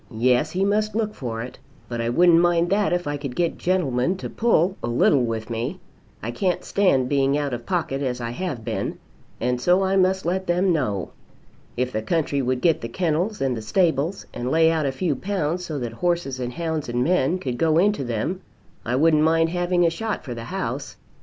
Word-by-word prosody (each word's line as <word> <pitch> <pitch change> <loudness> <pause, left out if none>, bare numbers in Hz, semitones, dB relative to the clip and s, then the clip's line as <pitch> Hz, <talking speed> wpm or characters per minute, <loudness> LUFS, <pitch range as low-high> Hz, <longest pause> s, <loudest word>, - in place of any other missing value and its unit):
Yes; 125 +1 +3
he 190 +2 0
must 210 +1 0
look 215 -1 0
for 115 - -4
it. 125 - -10 0.3
But 120 -1 -3
I 115 - -1
wouldn't 170 +6 +5
mind 175 0 +2
that, 205 0 +2
if 175 0 0
I 145 0 -2
could 140 -3 -6
get 170 -2 0
gentlemen 175 -2 +1
to - - -6
pull 195 -5 +2
a - - -3
little 120 +3 +3
with 115 -1 -3
me. 120 +11 -3 0.4
I 115 - -2
can't 180 +9 -1
stand 160 -11 +2
being 140 0 +2
out 145 -3 -2
of 120 -1 -6
pocket 160 -7 -1
as 125 -2 -2
I 115 -1 -4
have 130 -5 -4
been, - - -3 0.4
and 125 +1 -1
so 180 +6 +3
I 190 +1 +1
must 190 0 +2
let 185 +2 -1
them 180 +1 +2
know. 105 - -1 0.7
If 125 +1 0
the 110 - -2
country 145 +2 0
would 130 0 -1
get 165 -3 +3
the 115 - -5
kennels 175 - -1
and 135 -2 +1
the 110 - -5
stables, 160 - 0
and 120 +1 -3
lay 160 +2 +4
out 155 -3 0
a - - 0
few 155 +2 -1
pounds 180 0 -2
so 155 - -4
that 120 -4 -4
horses 170 -3 -1
and 125 -1 -3
hounds 160 -4 -3
and 120 +1 0
men 175 +1 +2
could 125 -9 -4
go 160 -1 +3
into 200 -3 +2
them, 120 - -2 0.4
I 120 - -1
wouldn't 155 +2 +4
mind 165 +1 +3
having 175 0 +1
a 165 - +3
shot 220 +5 -3
for 125 - -5
the 115 -1 -7
house. - - -4
155 Hz, 215 wpm, -23 LUFS, 125-180 Hz, 0.7 s, wouldn't